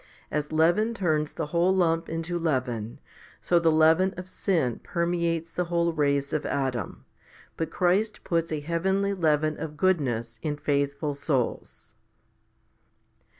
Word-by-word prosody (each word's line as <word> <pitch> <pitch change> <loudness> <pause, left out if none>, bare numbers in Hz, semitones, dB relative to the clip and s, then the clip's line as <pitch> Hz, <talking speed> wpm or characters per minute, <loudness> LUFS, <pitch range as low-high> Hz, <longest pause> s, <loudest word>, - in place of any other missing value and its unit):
A - - 0
s 150 0 -3
leaven 175 +9 +2
turns 155 -7 0
the 160 - -3
whole 175 +2 +3
lump 165 -2 +1
into 165 +2 -3
leaven, 125 -8 -2 0.4
so 175 - +2
the 165 -1 +3
leaven 160 +4 +4
of 180 0 -7
sin 165 - -1
permeates 170 -1 -1
the 180 +1 -1
whole 170 0 0
race 140 -2 0
of 155 - 0
Adam; 130 -7 -3 0.5
but 165 -1 -2
Christ 190 +6 +1
puts 165 -1 -1
a 155 -2 -2
heavenly 190 +5 0
leaven 155 -4 +1
of 150 -1 -6
goodness 125 -11 0
in 150 -2 -2
faithful 145 0 -1
souls. 140 -3 -3
160 Hz, 140 wpm, -26 LUFS, 145-175 Hz, 0.5 s, leaven